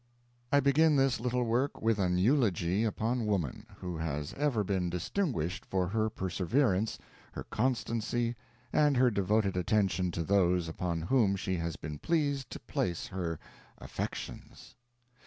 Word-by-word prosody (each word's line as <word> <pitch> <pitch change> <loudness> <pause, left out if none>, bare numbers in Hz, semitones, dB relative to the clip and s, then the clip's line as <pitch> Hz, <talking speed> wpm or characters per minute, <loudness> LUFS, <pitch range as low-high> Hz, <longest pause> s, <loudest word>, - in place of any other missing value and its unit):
I 145 - +5
begin 150 +3 +4
this 135 -2 +3
little 125 +1 0
work 120 +4 0
with 110 -1 +1
an 90 -2 +2
eulogy 100 - +2
upon 115 +2 -1
woman, 105 +2 -1
who 90 -2 -4
has 75 -2 -3
ever 140 -7 +1
been 95 -2 0
distinguished 90 - -2
for 95 -2 -1
her 110 +2 +1
perseverance, 95 - 0 0.4
her - - -5
constancy, 120 0 -1 0.4
and 145 -3 +4
her 125 -1 +5
devoted 100 0 +1
attention 95 -1 +1
to 85 - -1
those 90 -2 +2
upon 85 0 -2
whom 105 -1 +3
she 95 -1 -2
has 85 -1 -3
been 75 -2 -7
pleased 145 -5 0
to - - -7
place 85 -2 -2
her 85 -4 -3 0.4
affections. - - -7
105 Hz, 140 wpm, -31 LUFS, 90-125 Hz, 0.4 s, I